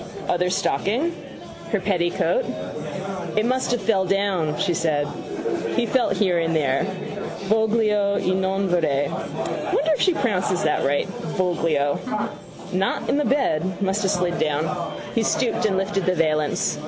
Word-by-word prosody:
Other 180 +1 +1
stocking. 225 - 0 0.6
Her 215 - +2
petticoat. 185 - +1 0.9
—It 215 - +3
must 255 +1 +1
have 245 -4 0
fell 195 -2 +3
down, 190 -5 +1
she 185 -3 +1
said. 155 -3 +1 0.7
He 240 - +2
felt 255 +1 +1
here 185 -5 +2
and 165 0 0
there. 140 -1 +2 0.6
Voglio 215 -1 +2
e 185 - +1
non 190 +1 0
vorrei. 150 -6 +1
Wonder 315 +2 -2
if - - -1
she 370 -3 +4
pronounces 185 - 0
that 155 - +1
right: 140 +1 +1 0.3
voglio. 165 -6 +1 0.7
Not 190 +1 0
in - - +2
the 295 - +1
bed. 185 - +1
Must 195 +1 0
have 195 - +1
slid 180 -2 0
down. 150 0 +1 0.5
He 230 - +2
stooped 225 0 +1
and 190 -2 0
lifted 195 -1 -1
the 185 - +3
valance. 155 -3 +1
190 Hz, 145 wpm, -23 LUFS, 165-215 Hz, 0.9 s, she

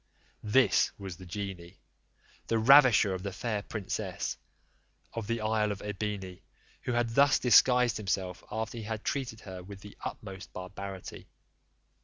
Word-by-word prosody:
This 105 -2 +4
was 95 -4 -7
the 95 - -11
genie, 95 -2 -6 0.7
the 115 - +1
ravisher 120 -4 +7
of 95 - -4
the 100 +1 -4
fair 105 +2 -2
princess 100 -2 -4 0.8
of 115 -3 -4
the 115 0 -1
isle 110 -1 +1
of 100 - -6
Ebene, 100 -3 -4 0.4
who 125 - -2
had 120 -1 +1
thus 140 +3 +5
disguised 125 0 +5
himself, 95 -3 -2
after 110 +2 -3
he 110 - -6
had 110 0 -4
treated 125 -5 -3
her 95 -2 -8
with 100 +2 -11
the 105 0 -12
utmost 95 -5 -7
barbarity. 95 0 -7
105 Hz, 145 wpm, -30 LUFS, 95-115 Hz, 0.8 s, ravisher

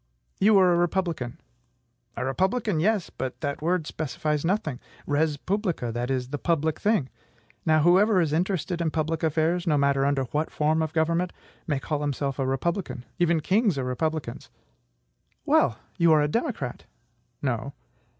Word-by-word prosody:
"You 210 +1 +5
are 185 -2 +5
a - - +2
republican." 170 -8 -1 0.8
"A - - -2
republican! 190 - 0
Yes; 205 +2 +1
but 130 -1 -5
that 140 -1 -3
word 170 0 0
specifies 150 0 -2
nothing. 165 - -1 0.3
Res 150 +1 +1
publica; 180 - -2
that 120 +2 -3
is, 130 -2 -1
the 145 +1 -4
public 160 -1 0
thing. 205 - +1 0.6
Now, 155 -1 +4
whoever 190 +4 +5
is 160 -4 +1
interested 175 0 -1
in 165 - +1
public 160 0 -1
affairs 165 +3 +1
no 150 -2 +3
matter 140 -1 +2
under 140 -1 +1
what 150 +2 0
form 155 +1 +1
of 160 -1 -1
government 165 +3 +1 0.4
may 145 -4 0
call 150 +1 -3
himself 140 -1 -2
a 135 - 0
republican. 135 -1 -2
Even 170 -2 +3
kings 200 - +2
are 135 - -1
republicans." 140 0 -3 1.0
"Well! 115 - +3 0.2
you 170 -1 +5
are 155 - +5
a - - +2
democrat?" 210 - -3 0.6
"No." 130 +1 -2
155 Hz, 160 wpm, -26 LUFS, 140-175 Hz, 1.0 s, You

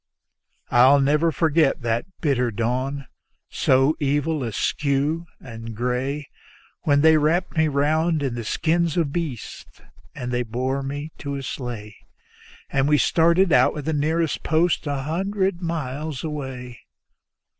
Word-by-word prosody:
I'll 130 +4 +6
never 150 +4 +2
forget 155 -3 +2
that 115 +5 -1
bitter 130 -6 +1
dawn, 130 +5 -2 0.5
so 135 +4 +3
evil, 145 +1 0
askew 140 - -1
and 115 -2 -9
gray, 130 +5 -2 0.6
When 145 -1 +4
they 160 0 +6
wrapped 165 +5 +1
me 160 -1 +3
round 155 +2 +1
in 135 -3 -1
the 120 -1 -4
skins 165 +7 0
of 150 -5 0
beasts 155 -10 -5 0.4
and 125 -1 -5
they 120 0 0
bore 130 +4 -2
me 145 +3 -5
to 140 -1 -4
a 135 - -5
sleigh, 115 -6 -6 0.8
And 135 0 +2
we 150 - +5
started 170 +3 +3
out 125 - +4
with 150 -2 -5
the 160 - 0
nearest 155 +2 0
post 160 0 +1
an 140 -2 -2
hundred 190 +3 -1
miles 155 -3 -4
away. 130 -5 -6
145 Hz, 135 wpm, -23 LUFS, 130-160 Hz, 0.8 s, I'll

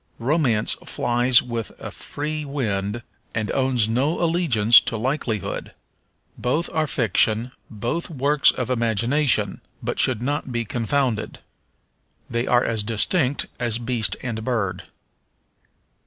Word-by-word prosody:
Romance 125 -4 +1
flies 120 +1 +3
with 115 -3 -5
a - - -7
free 150 +1 -4
wing 115 -6 -3 0.3
and 110 -2 -1
owns 130 -5 +1
no 130 +8 0
allegiance 155 -11 +5
to 115 - -4
likelihood. 120 - -3 0.6
Both 150 +8 -1
are 155 -1 0
fiction, 115 0 +2 0.2
both 120 - -3
works 145 -1 +3
of 130 -1 -2
imagination, 115 -1 +2 0.2
but - - -3
should 125 -5 +3
not 145 0 -2
be 120 -1 -2
confounded. 120 0 -1 0.9
They 120 +1 -2
are 125 0 +3
as 110 -2 -1
distinct 125 - +1
as 120 -2 0
beast 120 -2 -1
and 115 -3 -4
bird. 100 -7 -2
120 Hz, 120 wpm, -22 LUFS, 110-140 Hz, 0.9 s, allegiance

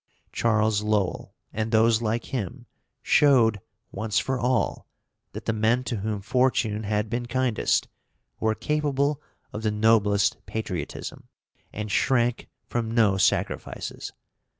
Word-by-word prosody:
Charles 110 -2 +2
Lowell, 105 -3 -1 0.2
and 110 +1 -2
those 110 0 +4
like 115 +1 -1
him, 125 +1 -4 0.4
showed, 115 -8 +4 0.3
once 105 +1 -2
for 130 -1 0
all, 125 0 0 0.5
that - - -7
the 115 - 0
men 110 +3 +2
to 120 -2 -3
whom 105 0 -3
fortune 110 -1 +1
had 105 +1 0
been 120 +2 -3
kindest 130 -2 +1 0.5
were 110 0 +1
capable 145 0 0 0.3
of 105 - -4
the 110 - +1
noblest 105 -1 +2
patriotism, 90 -8 -5 0.4
and 105 0 -5
shrank 120 +1 +1 0.2
from 115 -2 -2
no 110 -4 +3
sacrifices. 95 - -1
110 Hz, 125 wpm, -25 LUFS, 105-125 Hz, 0.5 s, those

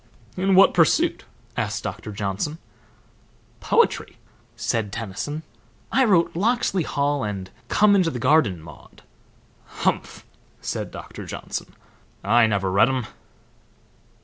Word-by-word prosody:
"In 190 +1 +2
what 195 - +7
pursuit?" 165 -4 +2 0.3
asked - - -2
Doctor 105 - -5
Johnson. 105 +9 -3 1.0
"Poetry," - - +1 0.4
said 110 -3 -1
Tennyson. 115 +9 -5 0.5
"I 265 - +4
wrote 180 -8 +3
'Locksley 205 -1 +1
Hall' 145 -2 0
and 100 -3 -4 0.2
'Come 210 -1 +5
into 185 -4 +3
the 130 - -5
Garden, 115 - +2
Maude.'" 75 -3 -15 0.6
"Humph!" - - -2 0.3
said - - -4
Doctor - - -9
Johnson. - - -6 0.5
"I 115 +3 +5
never 100 -3 0
read 100 +6 +5
'em." 130 -3 -1
130 Hz, 115 wpm, -23 LUFS, -, 1.0 s, what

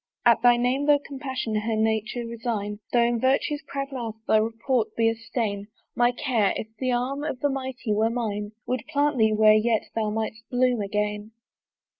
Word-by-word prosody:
"At 235 -1 +5
thy 245 0 +6
name 255 +4 0
though 295 -1 +6
compassion 265 -5 -5
her 215 +1 0
nature 220 +2 0
resign, 220 -3 -3
"Though 240 -1 +4
in 235 0 +1
virtue's 275 +4 +1
proud 275 0 -4
mouth 235 -5 -4
thy 220 - +5
report 225 +2 0
be 225 -1 +3
a - - 0
stain, 225 -3 -3 0.3
"My 240 0 +4
care, 240 -5 +1
if - - -4
the 255 -1 0
arm 255 +4 -1
of 285 -4 -3
the 290 - +2
mighty 260 -4 -3
were 220 +2 +2
mine, 210 -3 -3
"Would 250 -3 -2
plant 290 -3 +1
thee 220 -1 +4
where 215 0 +6
yet 220 +1 +1
thou 220 -1 0
might'st 220 +1 -4
blossom 250 -2 +2
again." 210 +1 -2
235 Hz, 185 wpm, -25 LUFS, 215-255 Hz, 0.3 s, thy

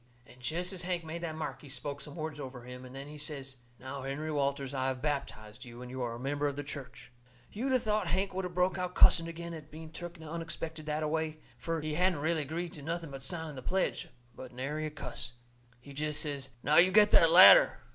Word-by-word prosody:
And 125 0 -17
jest 175 +9 -1
as 185 - -4
Hank 180 -1 -2
made 165 +2 -5
that 160 -2 -3
mark 135 -4 -4
he 145 - -12
spoke 140 +1 -4
some 145 +2 -8
words 155 -2 -4
over 130 -3 -7
him, 125 +1 -9
and 130 +1 -11
then 135 +1 -7
he 150 0 -9
says: 140 -3 -4 0.2
"Now, 130 +3 -6
Henry 140 +4 -3
Walters, 140 -2 -1
I 130 -1 0
have 130 -1 -1
baptized 130 -6 -4
you, 120 0 -9
and 125 - -8
you 130 0 -4
are 120 -1 -2
a - - -8
member 145 +3 0
of 140 - -2
the 145 - -4
church." 135 -3 -9 0.4
You'd 255 +6 -2
a 260 - +5
thought 215 -4 0
Hank 190 +3 0
would 190 +1 -2
of 180 -1 -6
broke 180 +1 +2
out 180 0 -3
cussing 165 -1 +7
agin 170 0 -6
at 155 -2 -9
being 160 0 -10
took 175 0 -8
unexpected 160 -1 -5
that 150 +1 -1
a - - +1
way, 160 0 -1 0.2
fur 165 -1 -3
he 155 0 -3
hadn't 175 -1 +2
really 160 +1 +1
agreed 165 +4 -4
to 150 - -8
nothing 165 +1 -4
but 135 0 -7
signing 160 +1 -4
the 130 - -7
pledge. 185 +8 -1 0.3
But 130 0 -9
nary 145 +5 -3
a - - -4
cuss. 150 -4 -6 0.5
He 140 +3 -12
jest 150 +1 -1
says: 140 -3 -4
"Now, 150 +1 +4
you 185 +2 +7
get 210 +1 +6
that 165 - +7
ladder." 190 - +9
155 Hz, 240 wpm, -32 LUFS, 135-170 Hz, 0.5 s, ladder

